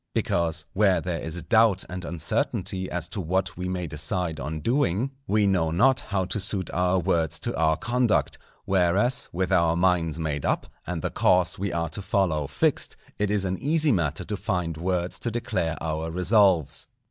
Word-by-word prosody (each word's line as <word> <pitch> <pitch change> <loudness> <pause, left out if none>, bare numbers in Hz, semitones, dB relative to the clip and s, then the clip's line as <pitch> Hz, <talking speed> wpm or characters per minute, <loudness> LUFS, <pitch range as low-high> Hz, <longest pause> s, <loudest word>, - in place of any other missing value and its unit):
Because, 80 -2 0
where 95 -2 +3
there 90 -2 -3
is 80 +1 -5
doubt 105 +2 +3
and 90 0 -6
uncertainty 95 +3 -1
as 90 -2 -2
to 105 -2 -4
what 95 +3 -1
we 90 0 -4
may 90 -1 -2
decide 80 +1 -2
on 75 +4 -4
doing, 125 - 0 0.2
we 105 0 +2
know 90 -5 +2
not 125 +11 +3
how 95 -3 -2
to 95 +3 -3
suit 95 -2 -3
our 90 +1 +1
words 85 -3 +1
to - - -1
our 80 -1 +2
conduct; 120 -3 0 0.3
whereas, 95 +7 +2
with 95 +2 -2
our 85 -3 +3
minds 85 -3 +1
made 75 -3 -2
up, - - 0 0.2
and 85 -3 -3
the - - -1
course 90 -2 +2
we 100 -1 -2
are 85 -1 -1
to 100 - -5
follow 90 -7 0
fixed, 70 - 0 0.2
it 105 -1 +1
is 100 -2 0
an 95 0 -2
easy 155 +2 +2
matter 85 - 0
to 105 +2 -4
find 90 -5 -2
words 90 +2 -2
to 120 - -2
declare 105 -8 -2
our 80 0 -2
resolves. 90 - +3
90 Hz, 180 wpm, -25 LUFS, 80-100 Hz, 0.3 s, where